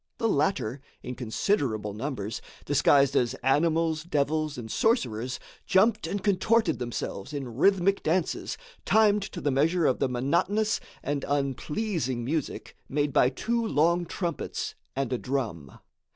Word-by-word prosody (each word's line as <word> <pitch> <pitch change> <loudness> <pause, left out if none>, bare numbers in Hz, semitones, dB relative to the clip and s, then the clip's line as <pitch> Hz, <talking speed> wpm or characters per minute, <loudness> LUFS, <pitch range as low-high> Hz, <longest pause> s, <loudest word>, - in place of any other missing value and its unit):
The 225 - +1
latter, 140 - 0 0.2
in 125 - -5
considerable 115 - -1
numbers, 110 -2 -4 0.2
disguised 140 -1 +4
as 120 -2 +2
animals, 160 +3 +2
devils 155 -1 0
and 110 -3 -6
sorcerers, 125 - 0 0.3
jumped 215 +3 +3
and 200 -1 -3
contorted 215 +3 +2
themselves 120 0 -4
in 130 -5 -5
rhythmic 195 +6 +3
dances 170 +2 -1 0.3
timed 210 -1 +4
to 195 -2 -6
the 145 -3 0
measure 160 +5 +2
of 130 - +2
the 135 - +1
monotonous 170 - +1 0.2
and 140 -1 -2
unpleasing 140 - -1
music 150 +2 -3
made 145 0 0
by 125 - +5
two 235 - -1
long 170 -3 +2
trumpets 170 -2 -3 0.2
and 135 -2 -1
a 125 - -1
drum. 110 - -3
145 Hz, 135 wpm, -27 LUFS, 125-185 Hz, 0.3 s, by